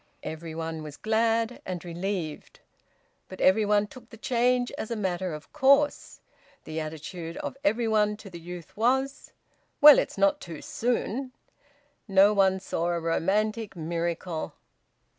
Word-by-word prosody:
Every 160 0 -6
one 160 -1 -4
was 150 -1 -9
glad 225 +2 +1
and 180 -1 -5
relieved, 175 -2 -4 0.7
but 185 - -9
every 200 +3 +4
one 205 0 +3
took 240 +2 -14
the 225 - -12
change 245 +1 +1
as 220 - -6
a 235 - -2
matter 185 -3 -2
of 150 0 -9
course; 280 +2 +3 0.4
the 155 +1 -5
attitude 160 +2 -6
of - - -5
every 235 -5 +2
one 210 -1 +2
to 210 -2 -11
the 170 - -8
youth 175 -1 -9
was: 265 +5 0 0.5
"Well, 295 -1 +10
it's - - -3
not 195 0 +3
too 165 -4 -8
soon!" 250 +2 -2 0.7
No 195 +1 +5
one 190 -2 +3
saw 170 -3 -2
a 175 -1 0
romantic 205 +6 0
miracle. 170 0 -3
195 Hz, 145 wpm, -27 LUFS, 170-225 Hz, 0.7 s, Well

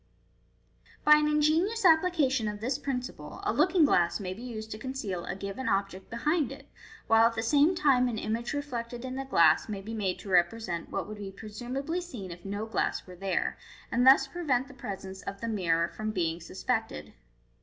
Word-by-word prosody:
By 300 0 +8
an 300 0 +2
ingenious 320 +9 +2
application 315 -8 +4
of 210 0 -4
this 255 +5 -2
principle 260 +2 -5
a 405 - 0
looking 345 +1 +4
glass 175 -9 +2
maybe 185 +2 -5
used 220 -3 -7
to 215 - -6
conceal 220 -9 -4
a - - -4
given 200 +6 -4
object 195 -1 -2
behind 295 +6 0
it, - - -10 0.4
while 225 0 +6
at 230 - -3
the 225 - -2
same 295 +8 +4
time 270 -7 +3
an 235 -3 -2
image 230 +3 -2
reflected 245 -4 -4
in 255 - -4
the 270 0 -4
glass 170 -7 +4
may 205 -2 -3
be 220 +3 -6
made 200 -4 -1
to 200 - -10
represent 175 0 +1
what - - -3
would 210 0 -8
be 200 -1 -5
presumably 245 - -4
seen 230 - -8
if 175 +1 -10
no 205 +2 -4
glass 220 - -1
were 180 - -11
there, 190 +1 -2 0.3
and 245 +2 +3
thus 270 0 +8
prevent 270 -4 -1
the 280 - -13
presence 195 -7 -7
of 195 - -6
the 230 - -4
mirror 170 -6 +1
from 215 0 -4
being 170 -4 -1
suspected. 195 - -3
230 Hz, 190 wpm, -29 LUFS, 195-275 Hz, 0.4 s, By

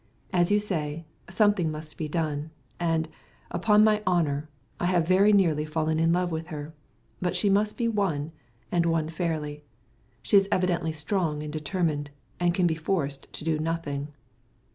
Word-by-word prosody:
As 175 -1 +3
you 205 0 +4
say, 165 -6 -3 0.2
something 195 -3 +3
must 155 0 -7
be 155 - -3
done, 155 -1 -2 0.3
and, 165 -2 +1 0.4
upon 210 -1 +4
my 215 -1 +4
honour, 155 -4 +1 0.3
I 175 - +1
have 175 -3 +2
very 195 +3 +5
nearly 170 -7 +3
fallen 155 0 -1
in 165 0 +3
love 180 0 +1
with 160 0 -3
her. 150 -2 -7 0.5
But 180 -1 0
she 195 +3 +2
must 210 +2 +2
be 235 - +1
won, 185 -9 0 0.4
and 170 -1 +2
won 165 -2 +1
fairly. 155 -3 -3 0.6
She 205 - +5
is 195 0 +3
evidently 175 -3 +1
strong 155 -1 -1
and 150 0 -6
determined, 155 -2 -1 0.3
and 175 -1 +3
can 185 -2 +2
be 170 - +3
forced 155 -4 -2
to - - -5
do 160 -1 0
nothing." 155 -3 -2
165 Hz, 165 wpm, -27 LUFS, 155-185 Hz, 0.6 s, very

